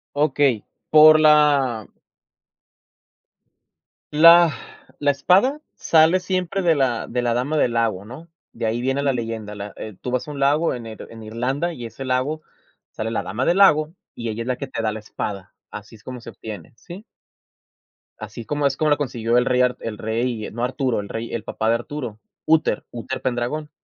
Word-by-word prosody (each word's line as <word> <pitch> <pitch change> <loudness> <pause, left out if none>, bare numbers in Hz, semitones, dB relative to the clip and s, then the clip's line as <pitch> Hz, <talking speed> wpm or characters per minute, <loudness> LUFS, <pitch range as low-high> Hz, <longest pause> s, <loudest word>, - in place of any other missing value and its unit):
Okey, 140 -6 +1 0.2
por 155 0 +8
la 145 -7 +4 2.3
la 170 +1 +7 0.5
la 145 -1 +3
espada 190 - +2 0.2
sale 165 +3 +4
siempre 185 +1 -2
de 170 -3 +3
la 130 -5 0
de 125 +1 -2
la 120 -1 0
Dama 130 +6 -1
del 120 -5 +2
Lago 110 -4 0
¿no?, 135 +10 -11 0.2
de - - -4
ahí 110 +2 -1
viene 135 +2 -1
la 140 - +2
leyenda, 115 -3 -4
la 100 0 -7
eh, 110 -3 -8
tú 125 - -5
vas 125 - -1
a - - -6
un 145 - -7
lago 145 +4 +2
en 120 -2 -7
Ir 110 -1 -9
en 115 -1 -11
Irlanda, 130 +10 -2
y 120 -4 -8
ese 135 +4 -8
lago 130 +5 -1 0.5
sale 110 +1 -4
la - - -1
Dama 120 +7 -3
del 175 - +2
Lago. 155 -4 +5 0.2
Y 115 -1 -4
ella 110 +1 -4
es 120 - -10
la 125 - 0
que 140 - -6
te 130 - -4
da 110 -1 0
la 110 - -5
espada, 100 -2 -6 0.2
así 105 +2 -10
es 105 - -19
como 125 -2 -8
se - - -10
obtiene, 105 -6 -9
¿sí? 185 - -11 1.1
Así 110 +1 -8
como 145 -1 -2
es 135 -1 +1
como 155 - +1
lo 145 - +3
consiguió 120 -4 -1
el 125 - +3
rey 125 0 +2
Ar 125 0 +1
el 110 -2 -6
rey, 110 0 -2
no 120 +2 -4
Arturo, 130 -2 -1
el 100 - -7
rey, 115 +1 -5
el 115 - -3
papá 110 0 -2
de 115 - +3
Arturo, 120 -2 -6 0.3
Úter, 160 0 +2
Úter 120 +2 -5
Pendragón. 130 +5 -2
125 Hz, 195 wpm, -22 LUFS, 115-150 Hz, 2.3 s, por